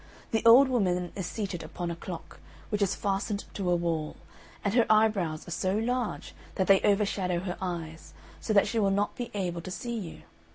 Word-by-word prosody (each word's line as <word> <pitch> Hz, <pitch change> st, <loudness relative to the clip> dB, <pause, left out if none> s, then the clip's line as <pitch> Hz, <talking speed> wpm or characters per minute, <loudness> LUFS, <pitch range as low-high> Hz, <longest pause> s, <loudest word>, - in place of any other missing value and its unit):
The 225 Hz, -1 st, +1 dB
old 255 Hz, +4 st, +9 dB
woman 180 Hz, -8 st, 0 dB
is 190 Hz, -3 st, -3 dB
seated 195 Hz, -5 st, -4 dB
upon 175 Hz, -1 st, -5 dB
a -, -, -4 dB
clock, 170 Hz, 0 st, -8 dB, 0.3 s
which 210 Hz, -1 st, -1 dB
is 195 Hz, -1 st, +2 dB
fastened 200 Hz, +1 st, -2 dB
to 190 Hz, -3 st, -2 dB
a 175 Hz, -, +4 dB
wall; 165 Hz, -3 st, -2 dB, 0.5 s
and 200 Hz, -, +1 dB
her 235 Hz, -1 st, +4 dB
eyebrows 210 Hz, -8 st, +2 dB
are -, -, -7 dB
so 185 Hz, +4 st, 0 dB
large 245 Hz, +1 st, -2 dB, 0.2 s
that 190 Hz, -, +1 dB
they 195 Hz, 0 st, +5 dB
overshadow 200 Hz, -4 st, +1 dB
her 180 Hz, -1 st, -4 dB
eyes, 165 Hz, -3 st, -5 dB, 0.2 s
so -, -, -3 dB
that 200 Hz, -2 st, +5 dB
she 230 Hz, -, 0 dB
will 200 Hz, -2 st, +3 dB
not 200 Hz, +1 st, 0 dB
be 245 Hz, -2 st, -5 dB
able 175 Hz, -4 st, -2 dB
to 185 Hz, -, -8 dB
see 235 Hz, +6 st, -4 dB
you. 190 Hz, -8 st, -6 dB
195 Hz, 200 wpm, -28 LUFS, 175-215 Hz, 0.5 s, old